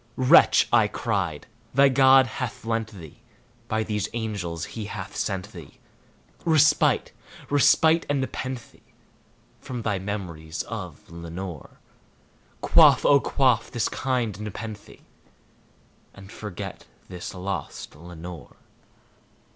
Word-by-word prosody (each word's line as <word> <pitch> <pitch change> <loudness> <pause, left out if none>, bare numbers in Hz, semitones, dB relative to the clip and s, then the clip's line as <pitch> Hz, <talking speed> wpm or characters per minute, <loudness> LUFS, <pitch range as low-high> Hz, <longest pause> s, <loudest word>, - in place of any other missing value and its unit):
"Wretch," 130 +6 +6
I 115 -3 +5
cried, 100 -8 -2 0.3
"thy 140 0 +7
God 135 0 +6
hath 120 -2 -6
lent 115 -1 -1
thee 95 +2 -12 0.5
by 110 -1 0
these 105 -2 -2
angels 100 -8 -4
he 110 -2 -5
hath 100 -1 -7
sent 100 +1 -3
thee 85 -7 -12 0.6
Respite 155 -3 +3 0.4
respite 160 +3 +4
and 145 -1 +1
nepenthe 130 -1 -5 0.8
from 125 -3 -6
thy 105 -3 -1
memories 85 -6 -5
of 90 -9 -8
Lenore! 85 -1 -8 0.8
Quaff, - - +6
oh 140 - +6
quaff 130 -5 +1
this 120 -3 -1
kind 120 -7 -2
nepenthe, 105 0 -8 1.1
and 100 0 -13
forget 100 -2 -7 0.2
this 90 +1 -7
lost 95 -3 -5
Lenore!" 85 -2 -10
105 Hz, 105 wpm, -25 LUFS, 90-125 Hz, 1.1 s, thy